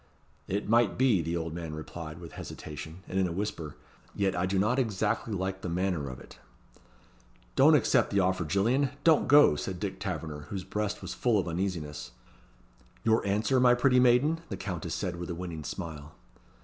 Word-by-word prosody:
"It 100 +2 -2
might 120 +2 +3
be," 125 -8 +4
the 85 +2 -2
old 80 -1 -4
man 80 -2 -5
replied, 80 +1 -7
with 85 -1 -10
hesitation, 80 +4 -8
and 95 - -1
in 95 - +2
a - - -4
whisper; 85 -5 -4 0.4
"yet 100 -1 +1
I 90 +1 0
do 95 +1 0
not 110 +7 +2
exactly 110 -1 -1
like 95 -1 -3
the 90 - -4
manner 85 -5 -1
of 65 0 -8
it." - - -14 1.2
"Don't - - +7
accept - - +3
the 100 - +1
offer, 95 -1 +1
Gillian. 115 - +2
Don't 160 -2 +4
go," 145 - +7
said 90 +4 -4
Dick 95 -2 -4
Taverner, 80 -7 -5
whose 95 -2 -4
breast 105 +2 -3
was - - -5
full 120 -4 +2
of 95 - 0
uneasiness. 85 -7 -3 0.9
"Your 110 0 +3
answer, 110 +6 +2
my 125 -1 +6
pretty 125 +1 +4
maiden?" 130 +7 +4
the 95 - -4
Countess 90 -4 -4
said, 90 -3 -3
with 85 0 -6
a 85 - -3
winning 85 -3 -6
smile. 80 -3 -7
95 Hz, 185 wpm, -29 LUFS, 85-110 Hz, 1.2 s, Don't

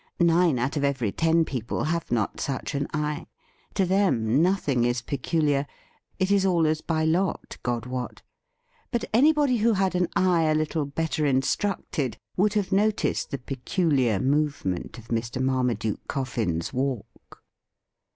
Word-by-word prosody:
Nine 170 -3 +4
out 130 +5 -1
of 145 - -1
every 135 -7 0
ten 165 +4 +2
people 120 -6 -3
have 170 +2 -1
not 115 -4 0
such 135 +2 -3
an 140 0 -1
eye. 150 +1 -2 0.5
To 195 - +2
them 160 - +2
nothing 165 -9 +2
is 120 0 0
peculiar 145 +1 0 0.3
— - - -39
it 190 +1 0
is 200 -1 +4
all 175 -4 +3
as 155 0 +1
by 160 -1 0
lot, 175 +3 0
God 120 -1 -2
wot. 125 -1 -5 0.7
But 235 -2 -1
anybody 285 +1 +4
who 230 +1 +3
had 190 -2 +1
an 180 -1 +1
eye 180 -3 +3
a 155 0 +2
little 155 0 0
better 155 +2 -2
instructed 140 - -1 0.2
would 205 +3 +2
have 205 -3 0
noticed 210 +2 +1
the 140 - -3
peculiar 135 - 0
movement 140 - -1
of 115 -1 -13
Mr. 115 +2 -2
Marmaduke 125 -4 -1
Coffin's 115 - -2
walk. 130 -3 -4
150 Hz, 150 wpm, -26 LUFS, 125-180 Hz, 0.7 s, Nine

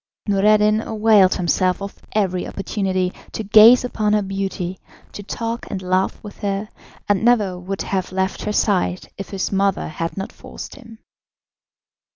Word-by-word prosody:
Noureddin 210 +1 +3
availed 215 -4 +4
himself 180 +1 +1
of 200 0 -7
every 185 -4 0
opportunity 190 -2 -2 0.2
to 220 - -3
gaze 220 +5 +7
upon 215 -4 0
her 210 -1 +2
beauty, 190 -2 -4 0.3
to - - -8
talk 230 +3 -4
and 195 - -3
laugh 185 +1 0
with 205 - -10
her, 200 +1 -2 0.4
and 205 +1 +1
never 210 -7 +2
would 190 +2 -4
have 190 -2 -2
left 190 +1 -1
her 210 - -1
side 185 -3 0
if 195 - -6
his 195 -2 -3
mother 195 0 0
had 165 +3 -4
not 195 - -4
forced - - -10
him. 230 -5 -13
195 Hz, 155 wpm, -21 LUFS, 185-215 Hz, 0.4 s, gaze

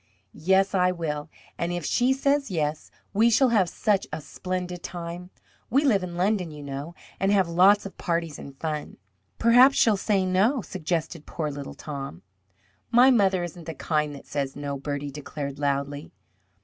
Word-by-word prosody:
"Yes, 190 +5 +2
I 180 -1 +3
will. 155 -3 -4 0.3
And 170 +1 -1
if 175 -3 -3
she 245 - +2
says 275 +1 +1
yes, 155 -4 -2 0.2
we 220 +3 +4
shall 255 +3 +4
have 200 -7 +3
such 200 +1 0
a 155 - -3
splendid 180 +3 -5
time. 175 +1 -6 0.4
We 275 +5 +3
live 210 -8 +4
in 175 -1 -6
London, 185 -1 +1
you 150 -1 -9
know, 140 +4 -6 0.2
and 195 +1 +2
have 195 -3 +3
lots 190 +5 +5
of 195 - -9
parties 165 -3 -2
and 140 -1 -10
fun." 155 0 -4 0.4
"Perhaps 245 +4 +6
she 225 - +5
will 205 - +1
say 195 -1 +1
no?" 205 +7 +2
suggested 165 -3 -3
poor 155 -3 -3
little 140 -1 -7
Tom. 135 - -7 0.7
"My 250 +3 +6
mother 195 -6 +3
isn't 175 -1 -7
the 160 - -5
kind 150 0 -1
that 140 - -12
says 140 -2 -3
no," 145 -1 -4
Bertie 145 0 -4
declared 140 0 -6
loudly. 140 0 -2
175 Hz, 175 wpm, -26 LUFS, 150-195 Hz, 0.7 s, Perhaps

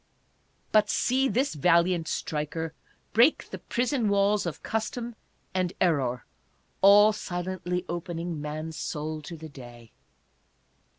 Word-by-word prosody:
But 210 -1 +4
see 265 +2 +2
this 260 +5 0
valiant 170 +2 +3
striker 160 +1 -3 0.4
break 240 +8 +4
the - - -6
prison 245 -2 0
walls 200 -1 +2
of 165 - -6
Custom 230 +2 -3 0.4
and 185 -1 0
Error, 135 -9 +1 0.6
all 205 +2 +7
silently 180 -1 -3
opening 170 -2 -4
man's 155 +1 -5
soul 155 0 -4
to 165 +3 -8
the 160 0 -9
day 120 -4 -12
175 Hz, 115 wpm, -27 LUFS, 155-210 Hz, 0.6 s, all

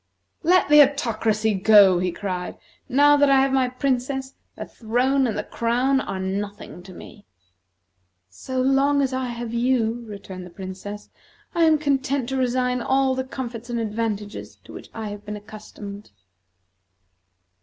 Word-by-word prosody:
"Let 360 +3 +3
the 300 0 +8
Autocracy 225 -6 +1
go!" 195 -2 +6
he 180 0 -1
cried. 180 0 -5 0.3
"Now 290 +3 +5
that 285 -1 +4
I 270 -1 +5
have 270 0 +2
my 260 -2 +2
Princess, 265 +1 -2 0.2
the - - -6
throne 255 +4 0
and 220 - -3
the 210 - -2
crown 250 +5 0
are 195 -6 -5
nothing 195 -1 -5
to 185 +1 -13
me." 205 +3 -13 1.0
"So 255 - -6
long 275 +2 +3
as 265 -1 -1
I 260 0 -2
have 235 -1 -6
you," 235 -1 0
returned 195 -3 -9
the - - -12
Princess, 190 +3 -8 0.4
"I 335 -1 +3
am 315 -1 +4
content 275 -3 -1
to 265 - -2
resign 250 -1 0
all 265 +1 +2
the 260 0 -2
comforts 245 -3 -7
and 235 -1 -2
advantages 215 -1 -4
to - - -13
which - - -10
I 220 -2 -6
have 205 0 -8
been 210 0 -6
accustomed." 210 -1 -10
240 Hz, 155 wpm, -23 LUFS, 205-265 Hz, 1.0 s, the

